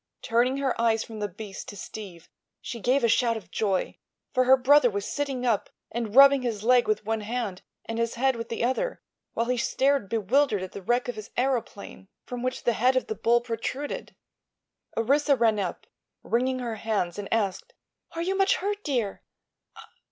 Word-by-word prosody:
Turning 245 +4 +2
her 275 -2 0
eyes 225 -1 +2
from 220 -2 -9
the 205 - -1
beast 200 +1 -9
to 205 - -9
Steve 190 -4 -9 0.3
she 235 - -6
gave 255 +5 +2
a - - +5
shout 230 0 +2
of 185 -5 -12
joy, 195 -4 -1 0.4
for 255 0 +3
her 260 +1 +7
brother 265 0 +5
was 200 -2 -3
sitting 275 -3 -2
up 230 -4 +1 0.2
and 230 -2 -4
rubbing 275 0 +8
his 225 -4 -3
leg 245 +1 +4
with 215 -1 0
one 225 0 -1
hand 215 -3 -3 0.2
and 225 0 -4
his 230 0 -1
head 265 +2 +2
with 230 0 -6
the 230 - -2
other, 260 - -1 0.3
while 230 - 0
he 250 +1 0
stared 265 -2 +1
bewildered 225 0 +2
at 185 - -7
the 200 - -8
wreck 240 +6 0
of 245 - -2
his 215 0 -8
aëroplane, 245 -6 -2 0.2
from 245 -1 -6
which 255 +1 -3
the 240 - +2
head 255 +4 +2
of 255 - +1
the 440 - -3
bull 240 - +2
protruded. 245 +4 -4 0.8
Orissa 280 +5 +3
ran 225 -4 +2
up, 185 -3 -4 0.4
wringing 255 +2 0
her 235 -3 -4
hands, 205 -4 -2
and 200 - -6
asked: 225 - -1 0.4
"Are 330 - -3
you 380 +2 -1
much 390 0 +3
hurt, 410 +2 -3
dear?" 240 -9 -2
235 Hz, 190 wpm, -26 LUFS, 215-260 Hz, 0.8 s, rubbing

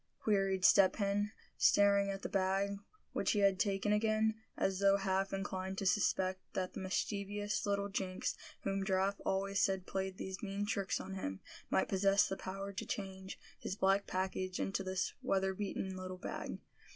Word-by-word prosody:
queried 195 -3 +2
Step 195 -2 +7
Hen, 205 0 0 0.3
staring 200 0 +5
at 195 0 -4
the - - -1
bag, 195 +1 0 0.3
which - - +1
he 210 - +1
had 195 -1 +4
taken 205 0 +1
again, 215 +1 +2 0.2
as 195 -1 +1
though 200 0 +5
half 195 0 0
inclined 190 -1 -3
to 195 - -2
suspect 185 -1 +2
that 185 -1 -2
the - - -5
mischievous 205 +2 -2
little 200 0 +1
jinx, 190 -2 -2 0.3
whom 195 0 -1
Giraffe 195 +1 +1
always 195 0 0
said 190 -1 +1
played 190 -1 -3
these 190 -1 -5
mean 200 0 -2
tricks 200 -2 -1
on 195 - -6
him, 95 - -4 0.3
might - - +2
possess 195 +1 +4
the 195 - -2
power 195 +1 -5
to 190 - -4
change 190 -1 -5 0.2
his 190 - -4
black 195 0 +2
package 185 0 -2
into 195 0 -1
this 185 0 -1
weatherbeaten 190 0 -1
little 185 0 -6
bag. 180 - -5
195 Hz, 165 wpm, -35 LUFS, 190-200 Hz, 0.3 s, Step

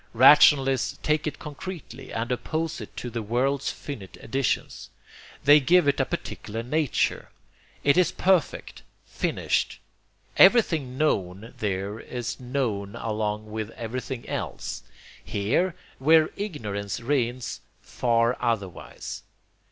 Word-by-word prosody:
Rationalists 135 +1 +6
take 150 0 +1
it 155 - -3
concretely 150 -3 -8
and 115 +2 -3
OPPOSE 160 +5 -2
it - - -10
to 120 - -5
the 115 0 -3
world's 130 +5 0
finite 110 -10 -8
editions. 135 +3 -2 0.5
They 145 +2 +8
give 170 +3 +4
it 140 - +2
a - - +3
particular 110 +2 -5
nature. 150 +2 0 0.5
It 140 +2 +4
is 180 -2 +4
perfect, 180 -5 0 0.2
finished. - - -1 0.6
Everything 165 - +5
known 100 -7 -1
there 100 +1 -2
is 120 +1 -5
known 120 -6 -2
along 105 -1 -3
with 110 0 -4
everything 120 +1 -5
else; - - -4 0.4
here, 135 - 0 0.2
where 155 +3 +5
ignorance 105 - -4
reigns, 125 -1 -1 0.2
far 115 0 +1
otherwise. 110 -7 -3
125 Hz, 115 wpm, -26 LUFS, 110-150 Hz, 0.6 s, They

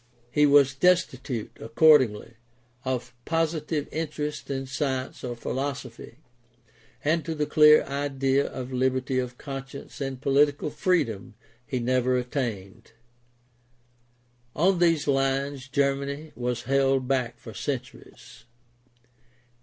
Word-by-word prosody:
He 150 +3 +4
was 140 -2 +5
destitute, 135 -8 0
accordingly, 115 -3 +4 0.5
of 125 -2 -3
positive 160 -1 -1
interest 150 -1 -4
in 135 -1 -3
science 130 -1 -3
or 125 -1 -4
philosophy, 130 -1 -5 0.9
and 160 +2 +2
to 160 - -4
the 150 -1 0
clear 150 0 +6
idea 140 -1 0
of 130 0 -7
liberty 130 0 0
of 125 -1 -4
conscience 135 +1 -8
and 135 -2 -3
political 145 +2 +2
freedom 125 - -1 0.3
he 130 - -2
never 125 +1 +1
attained. 115 -4 -4 1.6
On 180 +3 +3
these 165 -4 +2
lines 135 0 0
Germany 140 +2 -1
was 120 0 -3
held 135 -1 +2
back 125 -3 -1
for 115 -2 -11
centuries. 130 -3 -7
135 Hz, 105 wpm, -26 LUFS, 125-145 Hz, 1.6 s, clear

